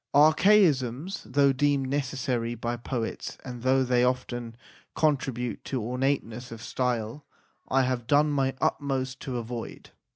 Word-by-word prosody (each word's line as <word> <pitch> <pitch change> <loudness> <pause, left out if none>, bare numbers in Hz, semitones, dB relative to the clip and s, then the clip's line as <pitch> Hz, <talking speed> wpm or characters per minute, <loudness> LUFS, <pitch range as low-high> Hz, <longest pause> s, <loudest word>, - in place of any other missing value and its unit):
Archaisms, 155 - +4
though 140 +1 +4
deemed 140 0 +1
necessary 130 -4 -1
by 120 +1 -3
poets, 120 -1 -4
and 125 -2 -7
though 130 +1 +3
they 125 -1 +2
often 120 -2 -2 0.4
contribute 135 -6 0
to 130 - -3
ornateness 125 0 -2
of 115 - -7
style, 120 +2 -2 0.4
I 135 0 +3
have 125 -2 -2
done 150 +1 +4
my 135 -2 +1
utmost 130 -2 -1
to 130 -2 -4
avoid. 120 0 -6
130 Hz, 130 wpm, -27 LUFS, 120-140 Hz, 0.4 s, Archaisms